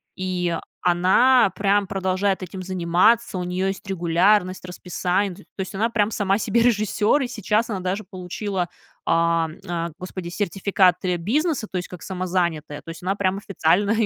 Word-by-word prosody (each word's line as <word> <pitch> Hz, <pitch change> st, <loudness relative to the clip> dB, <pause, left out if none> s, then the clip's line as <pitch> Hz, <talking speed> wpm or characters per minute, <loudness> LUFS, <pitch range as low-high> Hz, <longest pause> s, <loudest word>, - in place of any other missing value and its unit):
и 180 Hz, -2 st, -1 dB, 0.3 s
она 190 Hz, +7 st, +4 dB
прям 200 Hz, 0 st, +2 dB
продолжает 190 Hz, 0 st, 0 dB
этим 185 Hz, +1 st, -7 dB
заниматься. 185 Hz, +5 st, +2 dB
У -, -, -2 dB
нее 180 Hz, +2 st, -1 dB
есть 195 Hz, +1 st, -4 dB
регулярность, 185 Hz, +2 st, +2 dB
расписание, 180 Hz, +2 st, -1 dB
т -, -, -15 dB
то 190 Hz, -, -8 dB
есть, 190 Hz, -, -5 dB
она 220 Hz, +4 st, +1 dB
прям 215 Hz, -2 st, +1 dB
сама 200 Hz, -1 st, +1 dB
себе 230 Hz, +2 st, +1 dB
режиссер, 215 Hz, +3 st, +2 dB
и -, -, -2 dB
сейчас 220 Hz, 0 st, 0 dB
она 195 Hz, -, -2 dB
даже 185 Hz, +3 st, -2 dB
получила, 185 Hz, 0 st, -4 dB, 0.4 s
а, 165 Hz, -1 st, +2 dB, 0.2 s
а, 170 Hz, -1 st, -2 dB
Господи, 185 Hz, -1 st, -6 dB
сертификаты 185 Hz, -1 st, +1 dB
бизнеса, 255 Hz, -, 0 dB
то 185 Hz, -, -2 dB
есть, 180 Hz, -, -6 dB
как 180 Hz, -2 st, -10 dB
самозанятая, 175 Hz, -5 st, -2 dB
то -, -, -11 dB
есть, 165 Hz, -, -10 dB
она 190 Hz, +2 st, 0 dB
прям 195 Hz, -1 st, 0 dB
официально 195 Hz, +1 st, +1 dB
185 Hz, 160 wpm, -23 LUFS, 180-205 Hz, 0.4 s, она